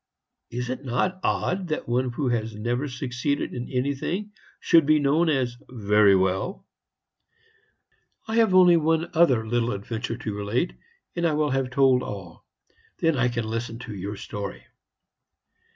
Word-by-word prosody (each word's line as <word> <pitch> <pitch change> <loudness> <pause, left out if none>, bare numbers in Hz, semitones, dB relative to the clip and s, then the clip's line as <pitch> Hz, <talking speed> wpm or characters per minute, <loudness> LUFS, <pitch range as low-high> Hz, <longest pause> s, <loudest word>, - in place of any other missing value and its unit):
Is 125 +1 -4
it 130 +2 -5
not 160 +9 -1
odd 185 0 0
that 155 - -3
one 125 +1 0
who 135 0 -1
has 115 -2 -2
never 120 +6 -2
succeeded 130 +2 -2
in 120 - -5
anything 140 +10 -2 0.3
should 165 -4 +4
be 155 0 +5
known 150 +4 +2
as 125 -5 0
'Very 105 -4 +4
well'? 95 - -1 1.6
"I 220 +1 -1
have 225 -5 +4
only 180 -2 +7
one 165 +1 +1
other 135 -9 +4
little 120 +1 0
adventure 115 +4 -4
to 110 -4 -4
relate, 105 - -1 0.4
and 170 -1 +1
I 160 - 0
will 150 -1 +1
have 135 -1 0
told 130 -1 +4
all. 95 -8 -8 0.5
Then 165 -2 +2
I 125 -2 +2
can 120 -2 -2
listen 115 +1 -4
to 120 -2 -8
your 100 +2 -5
story. 100 0 -6
125 Hz, 150 wpm, -25 LUFS, 115-155 Hz, 1.6 s, only